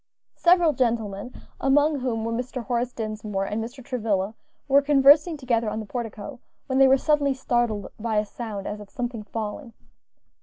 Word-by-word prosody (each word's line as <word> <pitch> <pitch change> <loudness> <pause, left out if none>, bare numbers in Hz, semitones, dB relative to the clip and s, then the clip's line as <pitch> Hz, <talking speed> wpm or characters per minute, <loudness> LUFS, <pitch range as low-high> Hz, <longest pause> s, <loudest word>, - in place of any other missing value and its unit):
Several 345 -3 +4
gentlemen, 230 -4 -1 0.3
among 290 +2 +3
whom 230 -3 -2
were 230 - -2
Mr. 250 +1 -3
Horace 245 0 -1
Dinsmore 215 -3 -3
and 215 +3 -2
Mr. 245 +2 -9
Travilla, 215 -5 -1 0.3
were 280 0 +5
conversing 290 +3 +5
together 235 -5 0
on 215 +1 -3
the 220 - -5
portico, 235 +2 -6 0.3
when 260 0 0
they 270 - +7
were 265 +1 +6
suddenly 285 -1 +2
startled 240 -5 0
by 225 0 -2
a 210 - +2
sound 210 -2 -6
as 210 - -4
of 205 -1 -11
something 240 -2 -4
falling. 225 +4 -6
240 Hz, 165 wpm, -25 LUFS, 215-270 Hz, 0.3 s, they